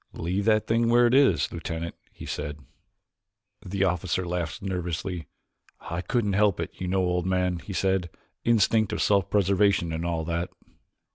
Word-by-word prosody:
"Leave 95 Hz, +5 st, -2 dB
that 110 Hz, -1 st, +3 dB
thing 115 Hz, +1 st, +2 dB
where 120 Hz, +1 st, +5 dB
it 120 Hz, -, +3 dB
is, 140 Hz, 0 st, +4 dB
Lieutenant," 85 Hz, 0 st, -4 dB, 0.2 s
he -, -, -10 dB
said. 75 Hz, 0 st, -4 dB, 1.1 s
The 95 Hz, +1 st, -1 dB
officer 90 Hz, 0 st, 0 dB
laughed 85 Hz, -2 st, -3 dB
nervously. 90 Hz, -2 st, -3 dB, 0.5 s
"I 85 Hz, +1 st, -4 dB
couldn't 105 Hz, -1 st, 0 dB
help 100 Hz, -2 st, +3 dB
it, 85 Hz, -, -3 dB
you 90 Hz, -, -2 dB
know, 95 Hz, +1 st, +1 dB
old 90 Hz, 0 st, 0 dB
man," 90 Hz, -1 st, +1 dB
he 100 Hz, -, -8 dB
said; 95 Hz, -2 st, 0 dB, 0.3 s
"instinct 110 Hz, -2 st, +3 dB
of -, -, -1 dB
self 100 Hz, -3 st, +2 dB
preservation 100 Hz, -3 st, +2 dB
and 80 Hz, +1 st, -3 dB
all 85 Hz, -2 st, -1 dB
that." 85 Hz, +1 st, -2 dB
95 Hz, 160 wpm, -26 LUFS, 85-100 Hz, 1.1 s, where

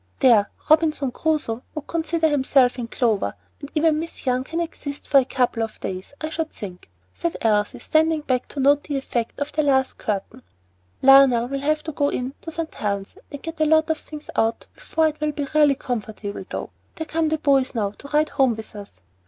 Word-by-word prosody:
"There! 225 Hz, -6 st, +5 dB, 0.2 s
Robinson 310 Hz, -4 st, +3 dB
Crusoe 295 Hz, -5 st, -1 dB
would 305 Hz, -1 st, -5 dB
consider 330 Hz, 0 st, 0 dB
himself 265 Hz, -3 st, +3 dB
in 235 Hz, -, -3 dB
clover; 220 Hz, -, 0 dB, 0.2 s
and 285 Hz, -, -9 dB
even 310 Hz, 0 st, +3 dB
Miss 330 Hz, -1 st, -7 dB
Young 255 Hz, 0 st, +1 dB
can 330 Hz, +5 st, -4 dB
exist 290 Hz, -4 st, -5 dB
for 280 Hz, -, +6 dB
a 260 Hz, -, 0 dB
couple 250 Hz, -3 st, 0 dB
of 225 Hz, -1 st, -4 dB
days, 185 Hz, +8 st, -6 dB
I 310 Hz, -, -3 dB
should 320 Hz, 0 st, -2 dB
think," 180 Hz, -, -9 dB, 0.2 s
said 135 Hz, -, -3 dB
Elsie, 210 Hz, -2 st, +1 dB
standing 315 Hz, 0 st, +2 dB
back 255 Hz, -4 st, -1 dB
to 285 Hz, -, -7 dB
note 285 Hz, +2 st, +4 dB
the 290 Hz, -2 st, -2 dB
effect 240 Hz, -4 st, -3 dB
of 285 Hz, +1 st, -2 dB
the 305 Hz, -, +1 dB
last 265 Hz, -3 st, +1 dB
curtain. 200 Hz, -3 st, -3 dB, 0.6 s
"Lionel 270 Hz, -3 st, +7 dB
will 275 Hz, 0 st, -2 dB
have 305 Hz, +2 st, 0 dB
to 315 Hz, -, -4 dB
go 285 Hz, -1 st, +1 dB
in 255 Hz, +2 st, -3 dB
to -, -, -7 dB
St. 325 Hz, 0 st, -5 dB
Helen's 200 Hz, -2 st, -3 dB, 0.2 s
and 285 Hz, -2 st, -8 dB
get 325 Hz, -1 st, -5 dB
a -, -, +5 dB
lot 315 Hz, +1 st, +4 dB
of 315 Hz, -, -2 dB
things 305 Hz, -1 st, -9 dB
out 225 Hz, +1 st, +1 dB
before 320 Hz, -10 st, +1 dB
it 305 Hz, 0 st, -11 dB
will 305 Hz, -1 st, 0 dB
be 285 Hz, -1 st, -2 dB
really 295 Hz, -2 st, +5 dB
comfortable, 220 Hz, -5 st, -5 dB
though. -, -, -5 dB, 0.2 s
There 320 Hz, -, -4 dB
come 320 Hz, 0 st, 0 dB
the 315 Hz, -, +1 dB
boys 275 Hz, -4 st, +2 dB
now 205 Hz, -3 st, 0 dB
to 270 Hz, -, -12 dB
ride 300 Hz, +1 st, +2 dB
home 270 Hz, -5 st, +2 dB
with 220 Hz, 0 st, -10 dB
us. 200 Hz, -, -11 dB
280 Hz, 210 wpm, -23 LUFS, 235-310 Hz, 0.6 s, Lionel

